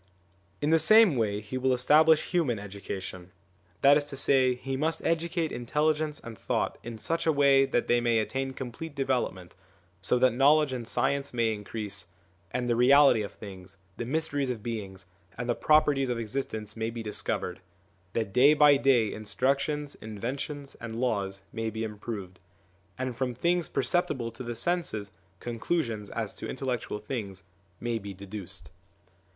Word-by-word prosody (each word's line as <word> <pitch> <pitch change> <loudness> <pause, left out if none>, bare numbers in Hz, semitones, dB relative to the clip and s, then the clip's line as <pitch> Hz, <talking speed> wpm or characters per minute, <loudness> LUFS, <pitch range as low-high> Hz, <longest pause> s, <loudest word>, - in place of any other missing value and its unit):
In 150 +2 +1
the 165 - +5
same 215 0 +6
way 105 -3 0
he 120 +5 -5
will 130 0 +2
establish 150 +5 +4
human 155 -10 +1
education; 95 -2 -7 0.5
that 140 +1 +8
is 145 - -1
to 145 -2 -6
say, 130 -2 +3
he 135 +2 -4
must 155 +4 -1
educate 165 0 0
intelligence 150 +4 0
and 115 -1 -9
thought - - -2
in 120 -1 -7
such 165 +9 -2
a - - +6
way 140 -2 +5
that 120 - 0
they 120 0 +3
may 120 -1 +2
attain 135 +4 -1
complete 135 +5 -7
development, 125 -10 -2 0.5
so 100 +6 +2
that 130 +1 +4
knowledge 140 +2 +4
and 120 -3 -4
science 135 +2 0
may 115 -2 +2
increase, 105 -3 -6 0.4
and 125 +6 -2
the 120 - +2
reality 130 -1 +6
of 100 - -5
things, 95 -2 -11 0.2
the - - -3
mysteries 145 0 -1
of 115 -4 -4
beings, 100 -5 -5 0.3
and 120 0 -4
the 120 - +2
properties 145 -2 +3
of 120 - -1
existence 110 -2 -4
may 110 0 -2
be 115 0 -6
dis 105 -2 -2
covered; 90 -3 -3 0.5
that 110 -4 -2
day 140 +5 +6
by 145 -1 +6
day 125 -6 +3
instructions, 140 +6 -1
inventions, 135 +6 -5
and 115 0 -5
laws 100 -5 -1
may 115 0 -2
be 110 0 -4
improved; 105 -4 -6 0.6
and 130 -1 -3
from 125 -1 -2
things 175 +5 +1
per - - -1
ceptible 130 -10 0
to 115 - -10
the 120 -1 -4
senses 115 - -2 0.3
conclusions 115 -3 -2
as 110 -3 -3
to - - -6
intellectual 130 -5 -3
things 105 -4 -6 0.4
may 120 -1 -2
be 100 -2 -8
deduced. 100 0 -8
125 Hz, 165 wpm, -28 LUFS, 110-140 Hz, 0.6 s, that